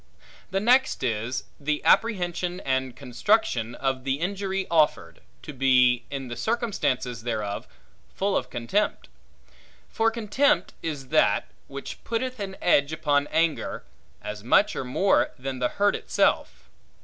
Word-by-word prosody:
The 190 +1 0
next 250 - +3
is, 115 +1 -1 0.2
the 150 +1 -1
apprehension 180 -4 +2
and 130 -2 -1
construction 125 - 0
of 135 -1 -2
the 135 0 0
injury 195 +3 -2
offered, 155 -3 +1 0.2
to 150 - -8
be, 125 -2 +3
in 135 -2 -5
the 120 - -5
circumstances 145 - -1
thereof, 105 -4 -3 0.5
full 195 0 0
of 125 - -1
contempt: 125 - -1 0.8
for 225 0 +2
contempt 225 -2 +1
is 145 -5 -5
that, 155 +1 +2 0.2
which 140 0 -8
putteth 250 +2 -3
an 195 -1 -5
edge 140 -4 +3
upon 145 -2 +1
anger, 165 -1 0 0.4
as 105 0 -6
much 195 - +3
or - - -2
more 160 +10 +2
than 130 0 -5
the 125 -1 +1
hurt 205 0 +1
itself. - - 0
145 Hz, 135 wpm, -26 LUFS, 125-195 Hz, 0.8 s, next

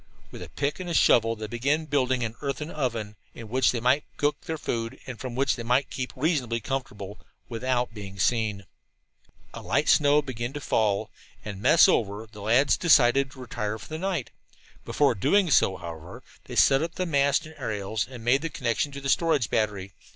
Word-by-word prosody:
With - - -10
pick 145 +4 -1
and 175 -2 -3
shovel 115 -1 +4
they 110 0 -6
began 140 +8 -1
building 130 -4 0
an 115 -1 -3
earthen 145 +2 -4
oven, 115 -7 -3 0.2
in 115 -2 -9
which 130 +1 +3
they 120 - -2
might 125 +5 +2
cook 145 0 -1
their 160 - -3
food, 115 -5 -3
and 125 -3 -8
from 125 -2 -6
which 135 +1 +1
they 120 - -6
might 125 +4 +1
keep 125 -1 -4
reasonably 130 -5 0
comfortable, 110 -5 -5 0.3
without 125 0 -1
being 100 -2 -9
seen. 105 0 0 0.9
A - - -8
light - - 0
snow 145 0 +4
began 125 -2 -5
to 145 - -5
fall, 105 -7 0 0.3
and, 100 -2 -6
mess 160 - +6
over, 110 - 0
the 105 -2 -11
lads 120 +5 +3
decided 135 -4 +4
to 135 - -15
retire 110 -3 -4
for 105 - -13
the 155 0 -5
night. 185 -8 -2 0.5
Before 145 -3 +2
doing 175 - +2
so, 95 - +4
however, 85 +1 -9 0.2
they - - -8
set 135 0 +5
up 165 +1 -4
the 185 - -1
mast 140 -1 +2
and 155 - -11
aerials 105 0 -3
and 125 -3 -10
made 130 +3 +3
the 165 - -3
connection 125 0 -1
to 140 - -7
the 140 - -4
storage 145 -4 +1
battery. 100 -3 -1
125 Hz, 190 wpm, -26 LUFS, 110-145 Hz, 0.9 s, mess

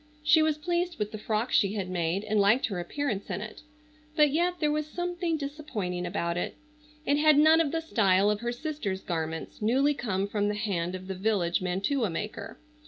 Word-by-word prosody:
She 300 +1 +5
was 310 -1 +2
pleased 345 +2 -1
with 210 -2 -2
the 215 - -6
frock 220 +3 -1
she 200 0 +3
had 200 -3 -3
made 180 +1 -1
and 215 0 0
liked 205 +6 +4
her 195 -5 -3
appearance 205 +3 -3
in - - -2
it, 215 +1 -8 0.5
but 300 -3 +5
yet 350 +4 +1
there 300 -2 +2
was 305 0 -1
something 350 0 -2
disappointing 240 - -4
about 170 -2 -2
it. - - -3 0.5
It 285 +1 +2
had 305 -1 +5
none 315 +2 +6
of 300 -4 0
the 330 - -1
style 205 -9 +3
of 210 - -1
her 240 +1 -2
sister's 245 -8 -4
garments, 160 0 -4
newly 265 +7 +3
come 200 -7 -2
from 205 0 0
the 210 - -1
hand 185 -4 -2
of 185 0 -8
the 190 - -4
village 190 -3 0
mantua 200 +7 0
maker. 210 +4 -5
215 Hz, 200 wpm, -28 LUFS, 190-300 Hz, 0.5 s, none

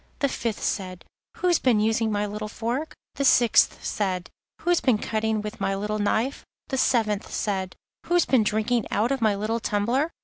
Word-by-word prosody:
The 280 - +1
fifth 230 -4 -3
said: 185 -3 -3 0.3
'Who's 355 -2 +2
been 240 -5 +3
using 220 +1 +1
my 205 0 0
little 210 +1 -5
fork?' 240 +8 -3 0.2
The 280 - 0
sixth 240 -3 +4
said: 185 -4 -2 0.3
'Who's 350 -1 +2
been 250 -5 +3
cutting 220 0 -1
with 215 +1 -7
my 195 - 0
little 210 +2 -2
knife?' 220 +6 0 0.3
The 265 - -1
seventh 215 -6 +1
said: 190 -3 -2 0.3
'Who's 350 0 +3
been 260 -4 +3
drinking 220 +2 0
out 230 +5 +1
of 270 -2 -1
my 215 -2 +3
little 215 +3 -1
tumbler? 235 +9 0
220 Hz, 175 wpm, -25 LUFS, 210-250 Hz, 0.3 s, sixth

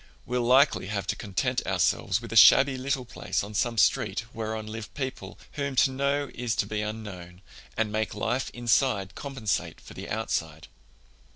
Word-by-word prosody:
We'll 125 0 -1
likely 130 -3 +4
have 100 -2 -3
to - - -12
content 100 -3 -1
ourselves 100 +3 +1
with 115 -1 -7
a - - -4
shabby 135 +5 +7
little 130 0 -2
place 115 - -3
on 105 +1 -8
some 115 +2 0
street 110 - +2
whereon 110 -1 -4
live 110 0 -7
people 130 -9 -5
whom 140 -2 -3
to 130 +2 +4
know 140 +1 -1
is 120 -2 -2
to - - 0
be 105 -1 -3
unknown, 95 -5 -7 0.3
and 110 -2 0
make 110 0 -2
life 120 +3 -1
inside 120 -4 +1
compensate 135 -8 -3
for - - -13
the - - -8
outside." 80 -1 -3
115 Hz, 170 wpm, -27 LUFS, 105-130 Hz, 0.3 s, shabby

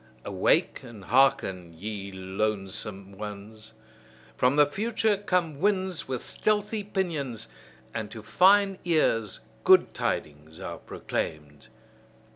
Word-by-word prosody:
Awake - - +1
and 115 -5 -11
hearken, 95 -10 +2
ye 100 +1 -5
lonesome 95 +1 -3
ones! 105 +2 -9 0.6
From 125 +2 +3
the 150 0 +7
future 215 +6 0
come 180 -7 -1
winds 190 -3 0
with 130 -2 -4
stealthy 210 0 0
pinions, 160 - -2 0.5
and 110 -2 -4
to 110 0 -9
fine 195 - +4
ears 115 - +1 0.2
good - - +6
tidings 75 +1 -3
are - - -6
proclaimed. 75 -2 -5
115 Hz, 105 wpm, -27 LUFS, -, 0.6 s, the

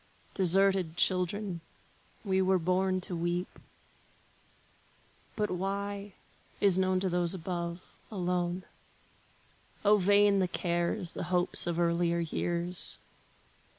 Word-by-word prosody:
Deserted 190 -2 +3
children, 185 0 0 0.6
we 190 -1 +2
were 190 0 +3
born 185 +2 +1
to 180 - -3
weep; 175 +2 -3 1.8
But 210 -1 -1
why, 200 +2 -3 0.5
is 195 -2 +4
known 185 0 +2
to 190 - 0
those 175 0 +1
above, 170 0 -4 0.3
alone. 180 -2 -2 1.2
O 210 +1 +6
vain 200 +1 +4
the 185 - +2
cares, 175 +1 -1
the - - -5
hopes 180 0 +3
of 170 0 -1
earlier 170 0 +1
years! 170 +1 -2
180 Hz, 105 wpm, -30 LUFS, 175-195 Hz, 1.8 s, O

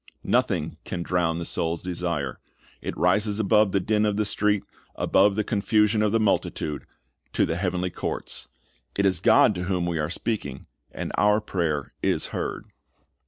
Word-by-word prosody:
Nothing - - 0
can 85 -2 -4
drown 85 -2 0
the 85 - -4
soul's 85 0 -1
desire. 85 -7 -3 0.4
It - - -5
rises 100 +5 +2
above 105 -1 +4
the 100 - +2
din 105 +3 +1
of 105 -1 +1
the 105 - +1
street, 105 -1 +1 0.3
above 100 +1 +3
the 110 - +1
confusion 105 0 +2
of 105 -1 +2
the 115 - +2
multitude, 80 -8 -1 0.5
to - - +3
the 80 - -2
heavenly 90 0 -1
courts. - - -4 0.5
It 100 - +2
is 95 -4 +3
God 110 +2 +5
to 90 -1 -4
whom 90 -2 0
we 85 -2 -1
are 75 +1 -1
speaking, 85 - -3 0.3
and - - -5
our 105 +1 +4
prayer 85 -9 -2
is - - +1
heard. - - -3
95 Hz, 165 wpm, -25 LUFS, 85-105 Hz, 0.5 s, God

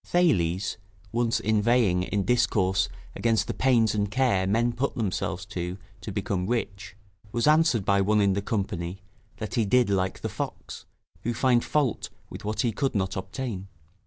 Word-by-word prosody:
Thales, 95 - +1 0.3
once 115 0 +1
inveighing 110 -3 +2
in 100 +2 -1
discourse 95 -6 +2 0.3
against 110 -3 +1
the - - -3
pains 120 -4 +3
and 105 -1 0
care 100 -5 +2
men 115 +4 +2
put 135 +4 -1
themselves 95 -4 -2
to 90 -2 -4 0.2
to 105 - -6
become 95 -2 -2
rich, 100 -5 -3 0.4
was 120 +1 0
answered 150 - +4
by 100 0 +3
one 105 +2 +3
in 100 -1 +3
the 100 - -1
company, 95 -3 -3 0.3
that 110 - -5
he 115 - +2
did 120 +1 +3
like 95 -1 0
the - - -2
fox, - - -6 0.4
who 120 0 -2
found 125 -1 +3
fault 145 -6 0 0.2
with - - -8
what 105 0 -1
he 120 - +1
could 135 +3 -1
not 95 +1 0
obtain. 95 +1 -5
105 Hz, 165 wpm, -26 LUFS, 95-120 Hz, 0.4 s, answered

